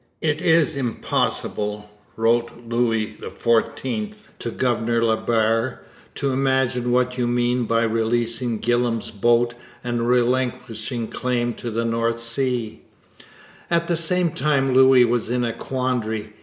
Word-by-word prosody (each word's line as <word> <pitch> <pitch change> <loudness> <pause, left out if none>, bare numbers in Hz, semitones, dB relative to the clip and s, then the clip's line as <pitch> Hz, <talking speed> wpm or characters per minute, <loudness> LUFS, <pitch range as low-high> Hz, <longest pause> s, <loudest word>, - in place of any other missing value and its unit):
'It 155 -1 -1
is 165 -4 +3
impossible,' 105 -4 -2 0.3
wrote 115 +1 +2 0.2
Louis 115 -2 0
XIV 130 - -1 0.2
to 120 - -4
Governor 115 -1 0
La 110 -1 +3
Barre, 115 +2 0 0.4
'to 140 - -1
imagine 130 -2 +1
what 125 +1 +1
you 120 - +1
mean 120 0 +1
by 115 +1 +1
releasing 115 +1 0
Gillam's 120 0 0
boat 120 +3 +2 0.3
and 120 -1 -1
relinquishing 120 -2 0
claim 120 -1 -1
to 120 - -6
the 115 +1 -2
North 115 0 0
Sea,' 115 -1 -2 0.9
At 170 0 +1
the 170 - +1
same 170 +1 +2
time 135 -2 +1
Louis 130 -1 +6
was 120 -1 -1
in 125 0 0
a 115 -1 -1
quandary. 115 -4 -3
120 Hz, 130 wpm, -22 LUFS, 115-130 Hz, 0.9 s, Louis